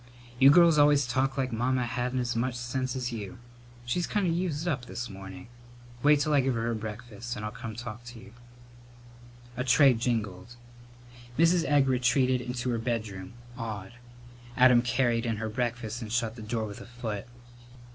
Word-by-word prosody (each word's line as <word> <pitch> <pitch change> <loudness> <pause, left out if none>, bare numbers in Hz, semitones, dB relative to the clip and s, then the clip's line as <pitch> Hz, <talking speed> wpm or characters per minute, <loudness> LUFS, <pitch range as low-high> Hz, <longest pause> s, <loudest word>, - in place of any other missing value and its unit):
You 135 - +8
girls 165 0 +6
always 145 -1 +5
talk 130 +3 0
like 130 -2 -1
Mamma 125 +2 0
hadn't 125 +1 -2
as 120 -1 -2
much 120 +2 -1
sense 125 +2 -3
as 125 -1 -2
you. 105 -5 -6 0.5
She's 170 +9 -1
kind 205 -2 0
of 170 - +1
used 170 -2 -2
up 140 -7 -1
this 120 -2 -5
morning. 95 0 -10 0.5
Wait 145 +1 +5
till 150 +1 +1
I 145 - +5
give 130 -1 0
her 115 - -1
her 115 0 0
breakfast, 115 +2 -6
and 105 - -5
I'll 105 - -3
come 115 -1 -7
talk 120 -1 -7
to 120 -1 -10
you." 110 - -14 1.2
A 125 - -2
tray 130 +2 +6
jingled. 115 -3 -3 0.8
Mrs. 170 +1 +4
Egg 145 -2 +3
retreated 125 0 +2
into 125 0 -3
her 115 - -1
bedroom, 110 -5 -4 0.3
awed. 105 -4 -5 0.6
Adam 125 -2 +7
carried 120 -1 +1
in 115 -1 -1
her 110 +1 -3
breakfast 120 0 -3
and 110 -2 -6
shut 115 -1 0
the 115 - -9
door 110 +1 -2
with 100 -1 -8
a - - -11
foot. 115 -4 -5
120 Hz, 180 wpm, -28 LUFS, 115-130 Hz, 1.2 s, You